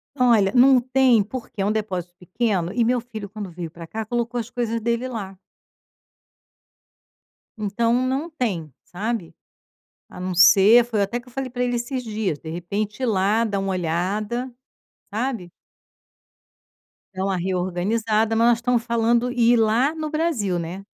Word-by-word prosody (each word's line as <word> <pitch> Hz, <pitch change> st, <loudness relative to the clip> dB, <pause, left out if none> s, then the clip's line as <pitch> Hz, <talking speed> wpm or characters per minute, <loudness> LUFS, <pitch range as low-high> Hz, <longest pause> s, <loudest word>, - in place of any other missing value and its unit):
Olha, 235 Hz, -7 st, +4 dB
não 255 Hz, +1 st, +6 dB
tem, 255 Hz, -3 st, +3 dB
porque 220 Hz, -1 st, -7 dB
é -, -, +1 dB
um 205 Hz, -, +1 dB
depósito 185 Hz, -5 st, -3 dB
pequeno 185 Hz, -1 st, -1 dB
e 240 Hz, -, +2 dB
meu 245 Hz, +2 st, +2 dB
filho, 220 Hz, -4 st, -8 dB
quando 205 Hz, -1 st, -7 dB
veio 170 Hz, -1 st, -7 dB
pra 165 Hz, 0 st, -10 dB
cá, 220 Hz, +5 st, -5 dB
colocou 240 Hz, +2 st, -2 dB
as 230 Hz, 0 st, -5 dB
coisas 230 Hz, -2 st, -2 dB
dele 235 Hz, +2 st, -1 dB
lá. 200 Hz, -6 st, -6 dB, 2.2 s
Então 220 Hz, +2 st, 0 dB
não 275 Hz, +6 st, -2 dB
tem, 195 Hz, -, -3 dB
sabe. 210 Hz, -1 st, -4 dB, 0.7 s
A -, -, -11 dB
não 185 Hz, 0 st, -3 dB
ser 200 Hz, +6 st, +7 dB
foi 225 Hz, -4 st, -1 dB
até 200 Hz, +5 st, -1 dB
que 245 Hz, -, -18 dB
eu -, -, -14 dB
falei 265 Hz, +1 st, -4 dB
pra 250 Hz, 0 st, -2 dB
ele 245 Hz, 0 st, 0 dB
esses 250 Hz, +2 st, -3 dB
dias, 215 Hz, -9 st, -2 dB
de 160 Hz, -, -9 dB
repente 200 Hz, +8 st, -4 dB
ir -, -, +3 dB
lá, 210 Hz, 0 st, +2 dB
dar 205 Hz, -3 st, -1 dB
uma 195 Hz, 0 st, -2 dB
olhada, 200 Hz, +8 st, -2 dB, 0.6 s
sabe. 220 Hz, -5 st, -3 dB, 1.6 s
Dar 190 Hz, 0 st, -2 dB
uma 195 Hz, -1 st, 0 dB
reorganizada, 195 Hz, +5 st, 0 dB
mas 230 Hz, +1 st, +4 dB
nós 240 Hz, -1 st, +4 dB
estamos 240 Hz, -1 st, +1 dB
falando 235 Hz, +1 st, +1 dB
em 250 Hz, -, -8 dB
ir 240 Hz, 0 st, +5 dB
lá 230 Hz, +6 st, +2 dB
no 315 Hz, -1 st, -4 dB
Brasil, 300 Hz, -, 0 dB
né. 170 Hz, +3 st, -5 dB
220 Hz, 165 wpm, -23 LUFS, 190-245 Hz, 2.2 s, ser